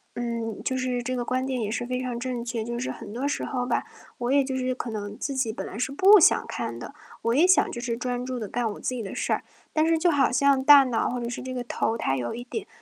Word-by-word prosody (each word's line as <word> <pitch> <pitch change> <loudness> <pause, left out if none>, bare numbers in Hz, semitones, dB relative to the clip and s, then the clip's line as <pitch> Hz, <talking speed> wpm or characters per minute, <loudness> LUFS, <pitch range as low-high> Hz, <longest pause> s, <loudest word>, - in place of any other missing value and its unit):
嗯， 230 -2 -3
就 260 - -1
是 255 -1 -1
这 255 +1 -3
个 245 - -1
观 255 +2 -1
点 260 -2 -2
也 215 -1 -2
是 240 - -2
非 250 +1 -2
常 245 -2 -3
正 250 -1 -3
确。 235 -2 -3
就 235 +1 -4
是 245 - -3
很 205 - -9
多 250 +4 -3
时 285 - -1
候 250 -2 -2
吧， - - 0 0.3
我 245 +1 -2
也 280 0 +4
就 265 0 -3
是 255 0 -1
可 250 - -5
能 205 -1 -5
自 275 - -3
己 255 -5 -1
本 - - -5
来 - - -7
是 250 +2 -1
不 390 +6 +7
想 360 - +5
看 - - -4
的， - - -8 0.3
我 230 - +1
也 310 +8 +5
想 375 - +4
就 - - -5
是 240 -1 -2
专 245 0 -3
注 255 0 -4
地 220 -3 -4
干 240 -2 -1
我 - - -11
自 - - -2
己 250 -2 -3
的 195 - -6
事 - - -2
儿。 - - -2 0.3
但 310 +1 +2
是 330 0 +3
就 340 +2 +3
好 280 -3 +3
像 275 +1 +3
大 285 0 +9
脑 250 -4 0
或 245 - -3
者 235 - -3
是 240 - -5
这 255 0 -5
个 250 - -3
头， 230 -1 -1
它 135 -11 0
有 120 - -3
一 240 - -6
点 395 - -6
250 Hz, 315 characters per minute, -26 LUFS, 235-265 Hz, 0.3 s, 大